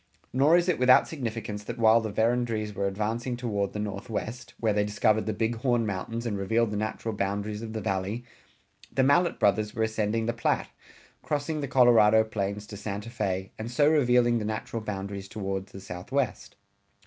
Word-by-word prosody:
Nor 145 +6 +5
is 175 0 +1
it 180 - +1
without 125 0 +6
significance 115 -7 -5
that 120 - -5
while 115 0 +5
the 110 - -3
Verendryes 110 -1 0
were 100 0 -1
advancing 115 +5 -2
toward 105 -5 -1
the - - -4
northwest 110 +3 -5
(where 110 -2 +1
they 105 0 +2
discovered 105 +1 +1
the - - +1
Big 115 +2 -1
Horn 120 -1 +1
Mountains 110 +4 -4
and 105 -4 -2
revealed 110 +3 +1
the - - -3
natural 110 +1 -3
boundaries 100 +1 -2
of 110 -1 -6
the 110 - -3
Valley) 100 +4 -2 0.7
the 130 +2 +2
Mallet 170 +6 +3
brothers 105 +2 +2
were 110 - +1
ascending 110 0 0
the 115 - 0
Platte, 120 - -1 0.5
crossing 150 +1 -2
the 140 - -2
Colorado 115 -4 +6
plains 105 -1 -3
to 105 -1 -9
Santa 105 +2 -5
Fé 95 -5 -2
and 110 +2 -4
so 145 +4 +3
revealing 125 -6 +4
the - - -3
natural 110 +1 -3
boundaries 100 -2 -5
toward 95 -2 -4
the 95 - -11
southwest. 100 +7 -3
110 Hz, 185 wpm, -27 LUFS, 105-120 Hz, 0.7 s, without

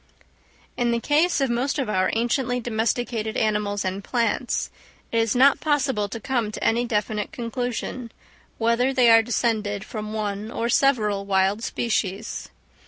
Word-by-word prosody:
In 240 -1 +1
the 235 0 +1
case 305 +5 +2
of 270 -3 +1
most 255 +5 0
of 270 - -1
our 185 -3 +1
anciently 245 +2 0
domesticated 225 -1 -1
animals 210 -2 0
and 190 +1 -3
plants, 235 +1 -1 0.4
it 230 - +1
is 225 0 +1
not 270 +3 +5
possible 270 -9 0
to 230 - -5
come 240 -4 -1
to - - -6
any 235 +2 +2
definite 210 -2 -2
conclusion, 245 -2 -4 0.5
whether 235 +3 +2
they 250 -3 +5
are 225 0 +8
descended 220 -3 -1
from 215 -1 -6
one 210 -1 -3
or 235 0 -2
several 215 -7 +2
wild 195 +2 +2
species. 215 -3 -2
230 Hz, 150 wpm, -24 LUFS, 210-245 Hz, 0.5 s, are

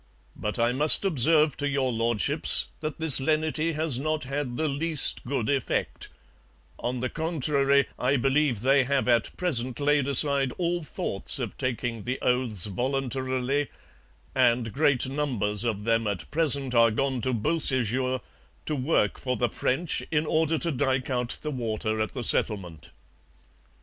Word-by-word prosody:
But 105 +2 -5
I 120 0 +1
must 150 +8 +5
observe 155 -2 +3
to 145 -1 -2
Your 135 -2 -1
Lordships 115 -2 0
that 155 0 -6
this 160 -5 +9
lenity 155 +2 0
has 155 -4 +1
not 155 +2 -2
had 135 -2 -4
the 160 - -1
least 150 +1 +1
good 125 -3 -3
effect; 140 -3 -2 0.7
on 125 0 -4
the 130 - -1
contrary, 140 -3 0
I 135 +3 +1
believe 135 -3 0
they 135 +2 +3
have 140 0 -1
at 120 -2 +1
present 130 -9 +1
laid 145 -1 +1
aside 140 -1 +5
all 175 0 -1
thoughts 150 - -1
of - - -5
taking 120 -2 -3
the 125 +4 -4
oaths 125 -7 0
voluntarily, 130 +4 -2 0.7
and 120 -3 +1
great 140 -3 +1
numbers 120 -7 -1
of 110 -4 -3
them 115 0 0
at 95 -5 -5
present 140 -4 +2
are 115 -1 +5
gone 130 +3 -2
to 130 - -2
Beausejour 130 -1 -1 0.4
to 155 - -2
work 130 -6 0
for 125 -2 -3
the 120 +1 0
French, 150 +10 -2
in 150 0 0
order 160 +1 0
to 170 +2 +1
dyke 130 -1 -1
out 125 -1 -3
the 150 - -3
water 110 -4 -3
at 110 - -3
the 125 - -5
settlement.' 90 -10 0
130 Hz, 155 wpm, -26 LUFS, 120-150 Hz, 0.7 s, this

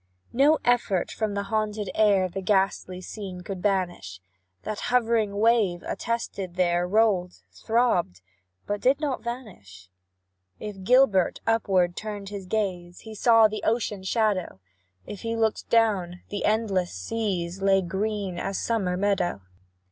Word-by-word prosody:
No 285 +5 +5
effort 240 -7 +1
from 215 -2 -2
the 200 - -1
haunted 210 -1 -2
air 200 -3 +3
The 190 +2 -5
ghastly 190 -1 0
scene 185 -1 -7
could 185 0 -6
banish, 180 - -1 0.4
That 215 -1 -4
hovering 225 -4 +1
wave, 210 -5 +2
arrested 200 -6 -4
there, 175 -1 +1
Rolled 195 -3 +2 0.2
throbbed 220 - 0 0.4
but 205 0 -3
did 265 +3 +3
not 290 -4 -2
vanish. 140 - -8 0.7
If 205 -3 -7
Gilbert 240 -4 +4
upward 190 -6 +2
turned 205 -2 -6
his 200 -2 -7
gaze, 180 -4 -3
He 220 - -10
saw 225 +1 +5
the 215 0 -5
ocean 220 -3 0
shadow; 190 - 0 0.5
If 200 - -8
he 230 0 -2
looked 225 -1 -1
down, 195 -6 +2
the 205 - -3
endless 205 -5 +1
seas 180 - -3
Lay 195 -1 +3
green 195 0 -3
as 195 - -3
summer 195 -6 -1
meadow. 195 - 0
200 Hz, 135 wpm, -26 LUFS, 180-220 Hz, 0.7 s, No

